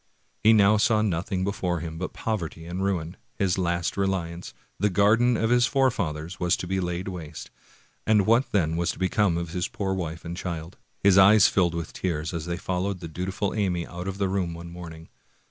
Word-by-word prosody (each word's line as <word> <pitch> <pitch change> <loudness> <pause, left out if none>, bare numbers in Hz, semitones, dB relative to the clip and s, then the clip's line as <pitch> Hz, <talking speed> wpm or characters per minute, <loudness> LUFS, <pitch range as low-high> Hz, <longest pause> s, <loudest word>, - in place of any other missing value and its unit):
He 110 - +7
now 105 -1 +5
saw 105 0 +3
nothing 95 -1 -1
before 90 -3 -1
him 80 0 -6
but 90 - -3
poverty 85 -7 -4
and 90 +3 -4
ruin; 90 -3 -2 0.2
his 95 -2 0
last 85 -1 -1
reliance, 90 -3 -2 0.3
the 105 - +2
garden 110 +5 +3
of 115 +1 0
his 120 0 +4
fore 135 -2 +3
fathers, 80 -5 -4
was 90 -1 +2
to - - -5
be 95 +2 -1
laid 90 0 -3
waste, 85 -5 -7 0.6
and 105 -3 +4
what 115 +4 +3
then 80 -5 +1
was 85 0 0
to - - -14
become 95 -1 +1
of 85 -1 -4
his 90 0 -1
poor 95 -2 -3
wife 85 -3 -4
and 85 +1 -5
child? 85 -2 -6 0.2
His 100 -1 +6
eyes 100 +2 +7
filled 85 -3 +1
with 85 -1 -5
tears 80 -2 -2
as 85 -1 -4
they 85 0 -2
followed 95 +1 -2
the 85 - -7
dutiful 95 +5 -3
Amy 90 -5 0
out 90 +1 -7
of 95 0 -4
the 100 -1 0
room 95 -3 -1
one 85 0 -9
morning. 80 -2 -9
90 Hz, 205 wpm, -26 LUFS, 85-100 Hz, 0.6 s, He